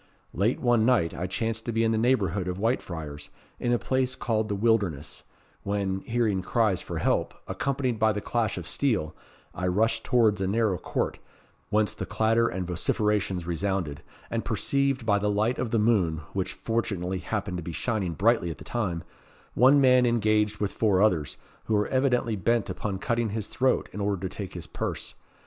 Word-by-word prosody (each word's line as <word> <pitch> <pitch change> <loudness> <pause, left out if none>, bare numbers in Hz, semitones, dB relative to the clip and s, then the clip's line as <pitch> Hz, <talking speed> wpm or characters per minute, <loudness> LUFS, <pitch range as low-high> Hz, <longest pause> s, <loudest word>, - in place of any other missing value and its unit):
Late 105 +7 +1
one 120 -3 +3
night, 110 -9 +3
I 90 - -3
chanced 110 +3 -2
to - - 0
be 115 0 +1
in 115 - +2
the 110 - +1
neighbourhood 100 -7 +1
of 90 0 -2
Whitefriars, 80 - -3 0.3
in 120 - 0
a 120 - +4
place 130 +1 0
called 110 -3 -1
the 100 - 0
Wilderness, 100 -9 0 0.4
when, 100 -1 -1
hearing 110 -3 0
cries 110 -2 +1
for - - -5
help, - - 0
accompanied 130 -4 -1
by 110 0 +4
the 105 - -2
clash 110 -1 -1
of 85 -2 -5
steel, 105 - 0 0.4
I 90 - -2
rushed 110 +5 +1
towards 110 -5 +3
a 95 - +1
narrow 105 -3 +1
court, - - -2 0.5
whence 105 0 +2
the - - -5
clatter 110 +2 +2
and 95 -3 -3
vociferations 95 +1 0
resounded, 85 -3 -2 0.3
and 115 -1 -1
perceived 130 +3 0
by 100 -2 +3
the 105 +1 0
light 105 +4 +1
of 125 - -1
the 115 - +1
moon, 100 -8 +2
which 95 -1 -2
fortunately 95 -4 -2
happened 100 -1 -3
to 85 - -5
be 85 - -5
shining 95 +1 -1
brightly 105 0 +2
at 80 - -5
the - - -11
time, 90 -8 -2 0.5
one 135 +4 +6
man 125 -2 +5
engaged 110 -2 +2
with 100 -1 -1
four 105 -4 +2
others, 80 -11 +1 0.3
who 110 - +1
were 105 0 +2
evidently 125 -4 +1
bent 115 +4 +1
upon 100 -3 -3
cutting 115 +3 0
his 105 0 -3
throat 130 0 +1
in 105 - -4
order 100 -2 -1
to 95 - -9
take 100 -3 -6
his 85 -2 -6
purse. - - -4
105 Hz, 185 wpm, -27 LUFS, 95-115 Hz, 0.5 s, one